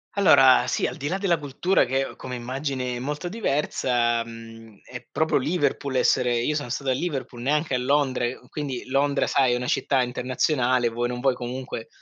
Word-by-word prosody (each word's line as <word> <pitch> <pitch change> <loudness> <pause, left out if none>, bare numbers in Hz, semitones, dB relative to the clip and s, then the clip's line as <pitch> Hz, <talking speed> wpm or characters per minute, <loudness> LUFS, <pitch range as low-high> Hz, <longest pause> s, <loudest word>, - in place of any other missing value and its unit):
Allora, 135 -10 +6
sì, - - 0
al - - -3
di 140 - -4
là 185 - -1
della 185 -5 +1
cultura 145 +5 +1
che 135 +2 -1
come 125 - -7
immagini 130 0 -3
è - - -5
molto 150 +7 -4
diversa, 125 - 0
mhmm, 115 -2 -12
è 125 -1 -9
proprio 160 0 +1
Liverpool 140 -2 -1
essere 125 -1 +2
io 120 +6 0
sono 145 -4 -3
stato 135 +2 -1
a - - +3
Liverpool, 135 -5 -4
neanche 150 +3 0
a 125 - +2
Londra 135 -1 +1
e 120 +2 -3
quindi 140 -5 -5
Londra, 140 +2 +1
sai, 130 -3 +2
è - - +2
una 125 0 -3
città 130 +1 +1
internazionale, 125 0 0
vuoi 120 +1 -2
non 125 0 -4
vuoi, 135 +1 +2
comunque 125 -1 -6
130 Hz, 190 wpm, -24 LUFS, 125-145 Hz, -, Allora